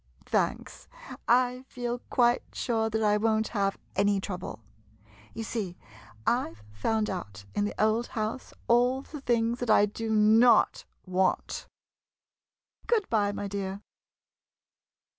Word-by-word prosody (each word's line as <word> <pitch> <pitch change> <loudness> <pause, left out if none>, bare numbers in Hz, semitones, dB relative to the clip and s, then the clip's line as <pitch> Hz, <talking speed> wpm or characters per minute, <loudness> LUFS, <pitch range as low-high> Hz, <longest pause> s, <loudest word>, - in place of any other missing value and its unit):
Thanks— - - -2 0.4
I 250 +1 +3
feel 245 0 -4
quite 240 -1 +3
sure 225 -2 0
that 220 0 -1
I 210 0 +4
won't 220 0 +1
have 195 -3 0 0.2
any 200 0 +2
trouble. 180 - -6 0.7
You 225 - -4
see, 205 -6 -4 0.5
I 240 - +1
've 105 - -20
found 220 - 0
out 100 - -6
in 205 - 0
the 205 - -5
old 220 +2 +2
house 220 +4 -3 0.2
all 245 +3 +3
the 300 -1 -9
things 235 -1 +1
that 245 - -3
I 205 -1 +6
do 225 +2 -5
not 220 +2 +5 0.2
want! 185 0 0 1.2
Good 445 -4 +2
by, 205 -3 +2
my 205 0 -4
dear. 200 0 -4
220 Hz, 130 wpm, -28 LUFS, 200-240 Hz, 1.2 s, I